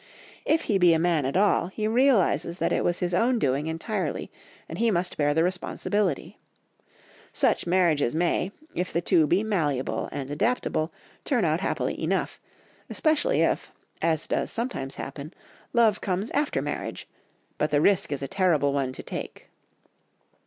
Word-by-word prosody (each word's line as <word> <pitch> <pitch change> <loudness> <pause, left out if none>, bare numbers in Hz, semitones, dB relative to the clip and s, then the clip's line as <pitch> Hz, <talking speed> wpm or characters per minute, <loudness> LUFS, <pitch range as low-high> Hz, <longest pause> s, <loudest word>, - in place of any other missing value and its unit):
If 320 +1 +2
he 205 -4 +1
be 175 -2 +6
a - - +3
man 165 -4 +1
at 140 - -1
all, 200 -3 +3
he 215 +3 -3
realises 230 -7 +2
that - - 0
it - - +1
was 175 0 0
his 180 0 -1
own 235 +7 +3
doing 140 - 0
entirely, 180 +5 -3 0.4
and - - -7
he 230 0 +3
must 180 -3 0
bear 145 -1 +1
the 160 - +3
responsibility. 185 0 -2 0.9
Such - - +1
marriages 170 -7 +2
may, 175 +3 +1 0.2
if 180 +1 -2
the 170 - +1
two 160 -2 +3
be 180 +7 +2
malleable 155 -11 -1
and 140 -1 -5
adaptable, 160 -2 0 0.3
turn 245 - +1
out 160 +1 +1
happily - - -2
enough, - - -1 0.5
especially 315 +11 +1
if, - - 0 0.3
as 160 -2 +1
does - - -1
sometimes 225 - -4
happen, 140 +4 -7 0.4
love 225 -3 +3
comes 195 +3 -2
after 290 +1 0
marriage, - - -5 0.5
but 150 - +1
the 145 - +2
risk 190 0 +2
is 140 -1 -2
a - - -2
terrible 155 -6 +2
one 135 -2 0
to - - -8
take. - - -7
175 Hz, 160 wpm, -26 LUFS, 150-210 Hz, 0.9 s, be